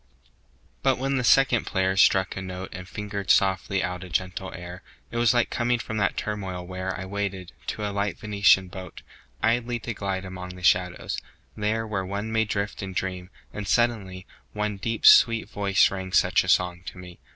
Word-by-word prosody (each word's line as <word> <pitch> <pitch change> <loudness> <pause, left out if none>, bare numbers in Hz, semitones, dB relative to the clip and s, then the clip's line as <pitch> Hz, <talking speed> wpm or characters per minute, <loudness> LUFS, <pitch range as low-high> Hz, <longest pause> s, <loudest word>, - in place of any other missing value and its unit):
II. - - -32 0.5
But - - +2
when 135 +1 -1
the 125 - 0
second 130 -1 +4
player 95 -1 +1
struck 95 -1 +4
a 95 - -4
note 95 0 -6
And 90 0 -8
fingered 100 -1 -5
softly 95 0 +2
out 90 0 -3
a 90 - -9
gentle 95 +2 -2
air 90 +1 -8 0.3
It 120 - -4
was 120 -2 +4
like 120 -1 +1
coming 120 0 +1
from 110 -1 -5
that 100 -2 +1
turmoil 95 -4 -4
where 95 0 -4
I 95 - -5
waited, 100 -2 -4 0.2
to 105 - -3
a 100 - -4
light 100 0 -1
Venetian 100 -3 +3
boat, 95 0 -10 0.4
Idly 120 +1 +1
to 120 - -4
glide 95 -2 -3
among 90 -1 -7
the 90 - -12
shadows, 90 0 +1 0.4
there 110 +1 -1
Where 105 -3 -2
one 100 +4 -4
may 110 0 +2
drift 100 0 -3
and 95 -2 -6
dream; 90 -1 -3 0.2
and 105 -2 -5
suddenly 100 -5 0 0.3
One 105 -1 -2
deep 115 +3 -3
sweet 115 -3 +7
voice 100 -1 -1
sang 95 -1 +3
such - - +4
a - - -4
song 90 -1 +2
to - - -7
me. 90 -1 -11
95 Hz, 195 wpm, -25 LUFS, 95-105 Hz, 0.5 s, sweet